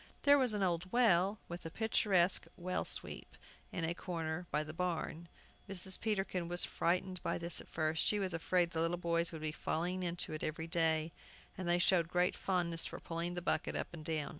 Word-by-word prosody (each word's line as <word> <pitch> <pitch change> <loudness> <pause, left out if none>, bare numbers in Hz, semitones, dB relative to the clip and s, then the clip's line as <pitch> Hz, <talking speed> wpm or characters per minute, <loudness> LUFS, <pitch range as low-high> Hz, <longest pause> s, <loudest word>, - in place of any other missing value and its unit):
There 285 0 +7
was 250 -5 +4
an 200 - 0
old 180 0 0
well, 200 -4 +4
with 175 +1 -7
a 165 - -5
picturesque 195 -3 +2
well 185 +1 -2
sweep, - - -2 0.3
in 175 - -3
a 165 - 0
corner 170 -1 -4
by 150 +1 0
the 155 +1 -7
barn. 170 -1 -2 0.4
Mrs. 190 0 -1
Peterkin 195 -5 -1
was 175 +1 +1
frightened 180 +1 0
by - - -1
this 170 -2 +3
at - - -14
first. 155 0 0
She 210 - +3
was 190 -3 -1
afraid 170 +1 +1
the 160 - 0
little 165 +1 +1
boys 170 -1 0
would 160 -2 -7
be 155 - 0
falling 175 +4 -2
in 175 -1 -2 0.2
every 155 +1 -2
day. 165 -1 +1 0.4
And 185 -3 -5
they 175 0 +4
showed 175 -1 +3
great 180 +1 +1
fondness 175 -3 0
for - - -7
pulling 170 +1 -3
the 175 - -4
bucket - - 0
up - - -2
and 160 -3 -8
down. 155 -2 -1
175 Hz, 200 wpm, -35 LUFS, 165-185 Hz, 0.4 s, There